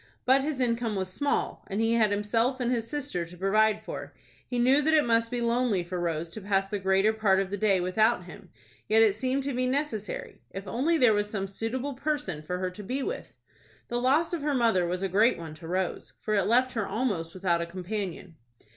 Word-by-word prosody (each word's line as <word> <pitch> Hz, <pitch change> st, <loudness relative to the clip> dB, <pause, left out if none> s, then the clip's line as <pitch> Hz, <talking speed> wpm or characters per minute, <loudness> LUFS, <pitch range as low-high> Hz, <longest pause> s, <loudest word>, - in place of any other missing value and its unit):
But 265 Hz, +2 st, +5 dB
his 290 Hz, -1 st, -2 dB
income 230 Hz, -3 st, 0 dB
was 190 Hz, -1 st, -3 dB
small, 285 Hz, +5 st, -1 dB
and 200 Hz, 0 st, -3 dB
he 225 Hz, +1 st, +2 dB
had 225 Hz, -2 st, +4 dB
himself 225 Hz, +5 st, 0 dB
and 245 Hz, -1 st, 0 dB
his 230 Hz, -2 st, -1 dB
sister 285 Hz, -, -2 dB
to 170 Hz, +1 st, -11 dB
provide 215 Hz, +3 st, +2 dB
for. -, -, -7 dB, 0.3 s
He 245 Hz, -, -3 dB
knew 260 Hz, +4 st, +4 dB
that 315 Hz, +2 st, +3 dB
it 305 Hz, -, +4 dB
must 230 Hz, -1 st, +2 dB
be 245 Hz, 0 st, -2 dB
lonely 235 Hz, -5 st, +1 dB
for 175 Hz, +1 st, -4 dB
Rose 165 Hz, -1 st, -2 dB
to 215 Hz, -, -8 dB
pass 195 Hz, 0 st, +1 dB
the 205 Hz, +1 st, -3 dB
greater 190 Hz, +3 st, +3 dB
part 205 Hz, -3 st, +3 dB
of 195 Hz, -1 st, -2 dB
the 205 Hz, -, -2 dB
day 195 Hz, -2 st, +3 dB
without 185 Hz, +5 st, +2 dB
him; -, -, -12 dB, 0.4 s
yet 220 Hz, +1 st, +6 dB
it 215 Hz, -3 st, +4 dB
seemed 260 Hz, +5 st, -1 dB
to 280 Hz, 0 st, -2 dB
be 255 Hz, +1 st, 0 dB
necessary. 255 Hz, -6 st, -3 dB
If 195 Hz, +1 st, -7 dB
only 305 Hz, -, +1 dB
there 250 Hz, -6 st, +5 dB
was 205 Hz, 0 st, 0 dB
some 195 Hz, -2 st, -3 dB
suitable 240 Hz, +8 st, -3 dB
person 290 Hz, -, -2 dB
for 180 Hz, +4 st, -4 dB
her 185 Hz, 0 st, -2 dB
to 185 Hz, -, -9 dB
be 260 Hz, +7 st, -2 dB
with. 465 Hz, -, -5 dB, 0.6 s
The 240 Hz, 0 st, -1 dB
loss 290 Hz, +8 st, +2 dB
of 340 Hz, -, -1 dB
her 290 Hz, -1 st, 0 dB
mother 225 Hz, -8 st, +3 dB
was 180 Hz, +2 st, -2 dB
a -, -, +1 dB
great 210 Hz, +6 st, +3 dB
one 165 Hz, -2 st, -7 dB
to 160 Hz, +1 st, -11 dB
Rose, 185 Hz, +1 st, -2 dB
for 215 Hz, -, -2 dB
it 200 Hz, -3 st, +2 dB
left 250 Hz, +3 st, +3 dB
her 225 Hz, -4 st, -1 dB
almost 195 Hz, -7 st, -2 dB
without 180 Hz, -2 st, +1 dB
a 170 Hz, -, -3 dB
companion. 185 Hz, -1 st, -5 dB
215 Hz, 225 wpm, -28 LUFS, 190-255 Hz, 0.6 s, yet